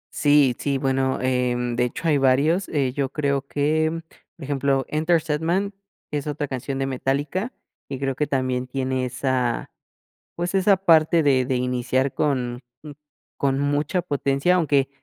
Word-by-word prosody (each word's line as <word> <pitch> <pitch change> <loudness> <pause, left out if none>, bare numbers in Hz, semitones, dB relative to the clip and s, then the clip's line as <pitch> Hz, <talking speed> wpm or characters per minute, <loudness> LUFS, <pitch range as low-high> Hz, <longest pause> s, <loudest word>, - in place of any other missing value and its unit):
Sí, 145 -4 +4
sí, 140 -1 0
bueno, 135 0 0
em, 125 -1 0
de 125 - +2
hecho 145 +7 -4
hay 150 -3 +3
varios, 140 +8 +2
eh, 135 -5 0
yo 135 -2 -1
creo 140 -2 0
que, 155 +3 0 0.3
por 160 - -12
ejemplo, 135 -1 0
Enter 160 +2 +2
Sandman, 165 +6 -1 0.4
que 150 - -1
es 145 - -8
otra 145 0 -2
canción 135 +1 -4
de 135 - -1
Metallica, 140 - -2 0.4
y 135 - -4
creo 135 0 -1
que 150 +3 -1
también 130 -2 -1
tiene 130 0 -2
esa, 125 -1 -1 0.7
pues, 175 +2 -3
esa 195 +1 +4
parte 165 -3 +4
de 130 -3 +3
de 130 0 -1
iniciar 125 +1 0
con 125 -5 -1 0.8
con 135 -1 0
mucha 145 +5 0
potencia, 140 0 +1
aunque, 145 -6 +2
140 Hz, 155 wpm, -23 LUFS, 130-155 Hz, 0.8 s, Sí